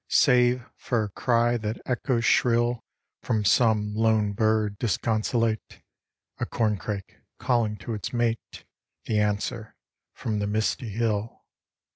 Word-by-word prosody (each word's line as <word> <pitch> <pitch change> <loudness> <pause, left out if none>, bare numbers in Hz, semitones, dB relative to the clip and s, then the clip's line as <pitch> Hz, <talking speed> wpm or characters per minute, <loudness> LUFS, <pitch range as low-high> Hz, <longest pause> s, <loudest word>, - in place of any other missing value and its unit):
Save 125 -2 +4
for 120 -4 -1
a 105 - -4
cry 120 +3 +1
that 110 0 -4
echoes 125 -1 0
shrill 120 0 +2 0.4
From 110 -4 -1
some 105 -2 +3
lone 110 -2 +2
bird 110 -1 +1
disconsolate; 115 0 -1 0.6
A - - 0
corncrake 105 -3 -2 0.2
calling 115 -4 0
to 115 +3 -6
its 105 -5 -4
mate; 120 -1 -2 0.4
The 110 -2 +1
answer 105 +2 -2 0.4
from 105 -2 -2
the 100 - -1
misty 110 +3 -1
hill. 110 0 -2
110 Hz, 120 wpm, -26 LUFS, 105-120 Hz, 0.6 s, Save